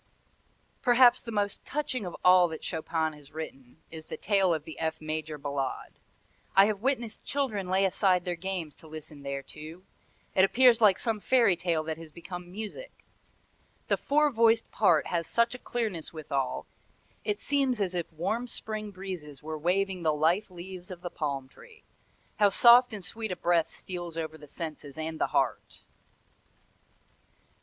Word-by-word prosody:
"Perhaps 245 0 +6
the 230 - -7
most 205 -2 -1
touching 260 -8 -2
of 175 - -6
all 180 -1 +7
that 160 -1 -7
Chopin 160 -1 -1
has 145 -1 -15
written 145 -3 -9
is 160 -1 -9
the - - -6
tale 195 -3 +2
of 160 -3 0
the 160 - -10
F 160 0 -2
major 155 0 -4
Ballade. 140 -1 -3 0.6
I 195 - +8
have 205 -1 -1
witnessed 240 -4 -1
children 245 -9 -1
lay 190 +1 +3
aside 185 -1 +2
their 180 - -1
games 175 -3 -4
to 160 - -14
listen 155 -1 -9
thereto. 150 +5 -7 0.5
It 190 - +5
appears 240 +3 +5
like 205 -4 +6
some 225 -3 -1
fairy 230 -4 +4
tale 170 -2 0
that 160 0 -4
has 165 -2 -11
become 175 +1 -8
music. 220 - -8 0.8
The - - +4
four 300 +1 +2
voiced 230 -1 +3
part 175 -7 +3
has 170 -2 -2
such 235 +1 +2
a 250 - -7
clearness 215 -12 -3
withal, 140 -5 -3 0.6
it 210 0 -1
seems 270 -4 +1
as 190 -3 0
if 175 -2 -3
warm 215 +10 -2
spring 215 -2 -4
breezes 180 -8 -8
were 155 +1 -4
waving 185 +3 0
the 155 -2 +2
lithe 170 +8 +2
leaves 180 0 -9
of 180 -2 -8
the 175 -1 -5
palm 140 -5 -3
tree. 460 - -17 0.5
How 205 -1 +5
soft 240 +4 +7
and 205 -5 -5
sweet 220 +3 -4
a - - -1
breath 175 -2 +2
steals 175 -3 -7
over 160 -1 -3
the 150 -1 -13
senses 150 -3 -7
and 160 0 -4
the - - +3
heart!" - - -1
180 Hz, 165 wpm, -29 LUFS, 160-215 Hz, 0.8 s, I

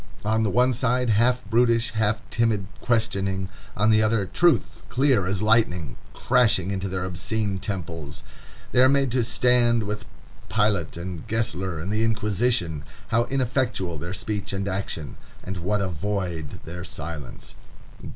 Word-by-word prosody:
On 110 +1 +2
the 110 - +2
one 125 +5 +3
side, 125 0 +1
half 125 +4 +2
brutish, 115 0 +2
half 110 0 0
timid 110 -4 +1
questioning; 100 -5 0 0.3
on 105 +2 +4
the 110 0 +5
other, 110 -2 +2
truth, 170 - +2
clear 130 -8 +2
as 100 +1 -1
lightning, 105 - +2 0.2
crashing 110 -7 +3
into 95 0 -2
their 95 0 -2
obscene 95 +3 -2
temples. 85 -7 -5 0.5
They 125 - +4
are 130 - +7
made 140 -2 +2
to 125 0 +2
stand 120 0 +3
with 105 +1 -4 0.4
Pilate, 100 -5 +1
and 85 -2 -6
Gessler, 95 -6 -1
and 90 +6 -4
the 110 +1 +1
Inquisition. 105 -7 0 0.3
How 115 +1 +2
ineffectual 125 - -1
their 85 +5 -5
speech 105 -2 -4
and 95 0 -2
action! 95 -6 -4 0.3
and 95 +1 -5
what 100 +4 0
a 100 - 0
void 90 -3 -3
their 90 +2 -7
silence! 75 -3 -7
105 Hz, 150 wpm, -25 LUFS, 95-115 Hz, 0.5 s, are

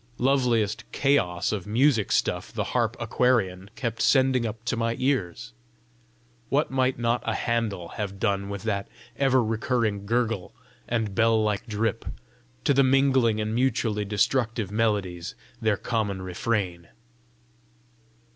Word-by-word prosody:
Loveliest 120 -5 +1
chaos 100 -12 +1
of 105 -3 -4
music 115 0 +2
stuff - - 0
the - - -2
harp - - +1
aquarian 100 -7 +1
kept 115 -3 -3
sending 130 -3 +3
up 110 +2 -8
to 115 - 0
my 115 0 -1
ears! 130 -9 -1 1.0
What 145 +1 +1
might 130 -1 +1
not 120 +1 0
a - - -1
Händel 110 -7 -2
have 100 -2 -5
done 100 -2 0
with 100 -1 -5
that 100 -3 -2 0.3
ever 130 -2 +3
recurring 110 -2 -1
gurgle 115 -4 -1 0.3
and 110 -4 -1
bell 110 0 +3
like 105 +2 -1
drip, 110 +1 -1 0.6
to 140 - +3
the 140 - +4
mingling 130 -4 +3
and 110 0 -2
mutually 115 -4 +1
destructive 110 +1 0
melodies 100 -5 -1 0.3
their 110 -3 +2
common 105 -5 -2
refrain! 90 -2 -2
110 Hz, 130 wpm, -26 LUFS, 100-125 Hz, 1.0 s, the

